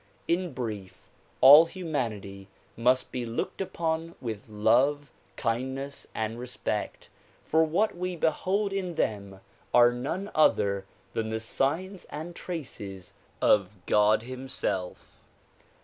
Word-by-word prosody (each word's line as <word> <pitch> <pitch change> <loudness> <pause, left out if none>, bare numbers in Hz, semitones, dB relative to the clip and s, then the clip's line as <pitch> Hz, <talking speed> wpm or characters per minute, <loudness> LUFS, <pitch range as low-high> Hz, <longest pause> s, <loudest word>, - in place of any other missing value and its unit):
In 175 -2 0
brief, 105 -7 -6 0.3
all 145 +5 +10
humanity 115 - -4 0.3
must 125 +3 +2
be 125 - -3
looked 115 +10 -3
upon 165 -2 -2
with 110 -3 -6
love, 125 +7 +2 0.2
kindness 130 +4 -3
and 110 +1 -2
respect, 125 -4 -4 0.4
for 160 +1 +3
what 175 +8 +1
we 180 0 -3
behold 190 +5 0
in 185 -3 -2
them 100 -5 -2 0.3
are 120 0 +7
none 165 +12 -4
other 100 -10 +3 0.3
than 110 -1 -2
the 110 0 -2
signs 165 - -2
and 165 +3 -7
traces 100 - -6 0.3
of 100 0 +3
God 105 +1 +4
himself. 125 -7 -5
130 Hz, 115 wpm, -28 LUFS, 110-165 Hz, 0.4 s, all